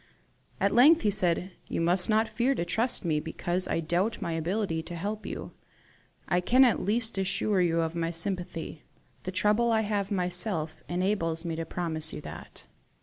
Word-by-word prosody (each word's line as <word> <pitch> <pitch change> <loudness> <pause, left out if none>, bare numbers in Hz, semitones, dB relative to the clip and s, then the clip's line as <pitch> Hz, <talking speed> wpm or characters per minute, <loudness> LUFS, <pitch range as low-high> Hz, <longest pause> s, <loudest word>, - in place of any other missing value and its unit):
At 200 - +2
length 295 +8 +6
he 210 - +3
said, 180 -1 +1 0.2
"You - - -3
must 175 +3 +2
not 220 +1 +3
fear 240 +5 0
to 170 - -2
trust 225 +5 +1
me 155 -3 +1
because 175 +3 -1
I 165 - -1
doubt 175 +7 0
my 170 - -3
ability 165 +1 -1
to 175 +2 -8
help 210 +5 -4
you. - - -6 0.8
I 180 - +1
can 255 +8 +5
at 240 - +2
least 225 +1 0
assure 195 +1 +1
you 165 -1 +2
of 165 0 -2
my 165 -1 -1
sympathy. 170 -2 -3 0.4
The 185 - -3
trouble 210 +5 +2
I 220 -1 +3
have 205 -2 -1
myself 180 -4 0
had 175 - -3
enables 175 -3 0
me 165 -1 -2
to 165 0 -4
promise 160 -3 -1
you - - -6
that." - - -10
180 Hz, 185 wpm, -28 LUFS, 165-210 Hz, 0.8 s, length